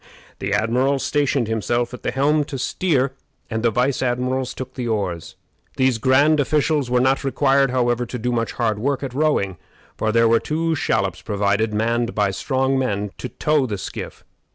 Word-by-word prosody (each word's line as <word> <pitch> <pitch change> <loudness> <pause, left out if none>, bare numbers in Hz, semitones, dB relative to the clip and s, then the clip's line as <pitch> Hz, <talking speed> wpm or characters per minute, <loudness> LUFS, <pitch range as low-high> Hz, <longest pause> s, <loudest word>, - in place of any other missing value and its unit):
The - - -3
admiral 120 +7 +2
stationed 140 -3 0
himself 120 +2 -1
at 125 - -8
the - - -2
helm 150 +3 +2
to 140 - -6
steer, 135 0 0 0.4
and 110 0 -1
the 115 - +3
vice 125 +4 0
admirals 130 +1 -1
took 130 0 -7
the 125 -2 -4
oars. 95 -7 -3 0.4
These 130 -3 +2
grand 140 +5 +4
officials 150 -1 +1
were 125 0 +3
not 130 +2 +2
required, 135 0 +2
however, 120 -1 0
to 125 - -5
do 125 +1 -2
much 115 -1 -1
hard 110 -3 -1
work 140 +4 -1
at 130 -3 -4
rowing, 130 - +1 0.4
for 110 - 0
there 115 +1 +4
were 115 0 +4
two 165 +4 -1
shallops 100 - -1
provided, 105 +1 0
manned 115 +2 0
by 105 -2 +2
strong 135 +5 0
men, 105 -5 -1
to 125 - -5
tow 150 -2 +1
the 105 -3 -3
skiff. - - -7
125 Hz, 180 wpm, -21 LUFS, 110-135 Hz, 0.4 s, grand